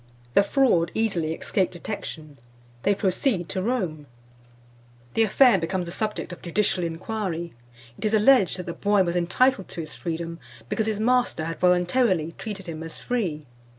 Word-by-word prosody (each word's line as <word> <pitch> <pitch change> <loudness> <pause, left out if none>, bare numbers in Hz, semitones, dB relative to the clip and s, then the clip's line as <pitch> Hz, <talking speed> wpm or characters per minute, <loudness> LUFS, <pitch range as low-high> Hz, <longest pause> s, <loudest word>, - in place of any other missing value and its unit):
The - - +6
fraud 200 -7 +3
easily 180 -8 0
escaped 185 +1 0
detection. 160 -5 -7 0.4
They 200 +7 +2
proceed 190 -1 0
to 190 -1 -2
Rome; 185 - -2 1.1
the - - +2
affair 225 0 +5
becomes 175 +2 -2
the 170 - -6
subject 210 -2 -3
of - - -11
judicial 180 +1 +1
inquiry; 170 0 -3 0.5
it - - -4
is 215 +1 +3
alleged 215 -4 +5
that 180 - -6
the 170 - -4
boy 205 +2 +2
was 175 -1 -2
entitled 195 +6 +2
to 170 - -5
his 155 -1 -8
freedom, 165 0 -4 0.3
because 220 - 0
his 215 -2 -1
master 245 -7 +2
had 165 -1 -5
voluntarily 180 -1 +2
treated 200 -3 -6
him 160 -3 -6
as 165 0 -7
free." 180 -12 -2
185 Hz, 160 wpm, -25 LUFS, 170-215 Hz, 1.1 s, The